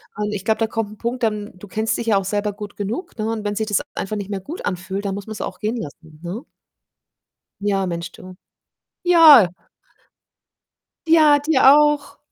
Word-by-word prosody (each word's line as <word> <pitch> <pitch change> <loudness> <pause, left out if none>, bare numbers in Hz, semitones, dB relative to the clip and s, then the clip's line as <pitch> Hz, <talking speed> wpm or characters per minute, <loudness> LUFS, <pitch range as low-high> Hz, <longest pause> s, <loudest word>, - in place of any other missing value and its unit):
und 210 0 -3
ich 195 -2 -5
glaube, 220 0 +1
da 225 - +1
kommt 220 -1 -3
'n 215 - -12
Punkt 240 +3 -4
dann 210 -2 -1
du 205 - -12
kennst 220 +4 -1
dich 230 - -5
ja 210 - +3
auch 195 - -2
selber 205 +1 -2
gut 205 0 -9
genug, 215 - -5
ne, 215 0 -2
und 220 -2 -4
wenn 205 0 -2
sich 220 +1 -2
das 210 - +1
e - - -7
einfach 205 +2 -4
nicht 200 -1 -5
mehr 200 -2 -3
gut 305 - -8
anfühlt, 190 +2 -4
dann 195 -1 -2
muss 200 +1 -8
man's 215 -1 -7
auch 185 - -6
gehen 215 +3 -2
lassen, 155 -5 -9
ne? 180 +7 -5 1.2
Ja, 195 -2 0
Mensch, 170 -1 -5
du. 185 0 -13 0.7
Ja. 320 - +8 1.6
Ja, 310 -2 +6
dir 290 -1 +1
auch. 295 -1 +2
210 Hz, 200 wpm, -21 LUFS, 195-235 Hz, 1.6 s, Ja